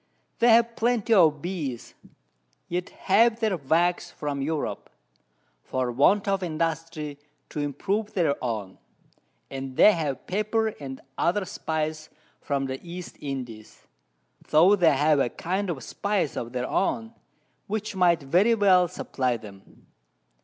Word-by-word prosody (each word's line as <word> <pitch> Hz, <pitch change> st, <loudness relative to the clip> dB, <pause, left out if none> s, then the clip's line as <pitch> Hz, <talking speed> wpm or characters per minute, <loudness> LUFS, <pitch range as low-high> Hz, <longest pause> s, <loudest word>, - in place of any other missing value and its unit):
They 240 Hz, -, +5 dB
have 230 Hz, 0 st, +5 dB
plenty 235 Hz, -1 st, +1 dB
of 160 Hz, -7 st, +4 dB
Bees, 155 Hz, -10 st, -4 dB, 0.7 s
yet 180 Hz, +1 st, -3 dB
have 225 Hz, +4 st, +2 dB
their 220 Hz, -4 st, +1 dB
Wax 170 Hz, +4 st, +1 dB
from 145 Hz, -2 st, -4 dB
Europe, 150 Hz, +1 st, -3 dB, 0.7 s
for 130 Hz, -, -2 dB
want 195 Hz, -, +3 dB
of 195 Hz, -1 st, +1 dB
Industry 160 Hz, -3 st, -3 dB, 0.3 s
to -, -, -5 dB
improve 195 Hz, +10 st, -2 dB
their 165 Hz, -8 st, +2 dB
own, 110 Hz, -6 st, -4 dB, 0.7 s
and 135 Hz, -1 st, -6 dB
they 215 Hz, -, +8 dB
have 150 Hz, -8 st, -3 dB
Pepper 215 Hz, +3 st, 0 dB
and 135 Hz, -2 st, -7 dB, 0.2 s
other 185 Hz, +3 st, +1 dB
Spice 155 Hz, -4 st, -3 dB, 0.3 s
from 140 Hz, -1 st, -1 dB
the 130 Hz, 0 st, -4 dB
East 175 Hz, 0 st, -8 dB
Indies, 125 Hz, -6 st, -7 dB, 0.7 s
tho' 175 Hz, +7 st, +6 dB
they 165 Hz, -7 st, +4 dB
have 150 Hz, +1 st, +3 dB
a 130 Hz, -, +2 dB
kind 185 Hz, +8 st, -3 dB
of 140 Hz, -8 st, -4 dB
Spice 200 Hz, -, -1 dB
of 120 Hz, 0 st, -4 dB
their 125 Hz, 0 st, -2 dB
own, 225 Hz, +3 st, -1 dB, 0.5 s
which 215 Hz, 0 st, -3 dB
might 175 Hz, -4 st, +3 dB
very 185 Hz, +12 st, +3 dB
well 185 Hz, -4 st, +5 dB
supply 130 Hz, -6 st, -2 dB
them. 100 Hz, -3 st, -15 dB
165 Hz, 135 wpm, -26 LUFS, 140-200 Hz, 0.7 s, they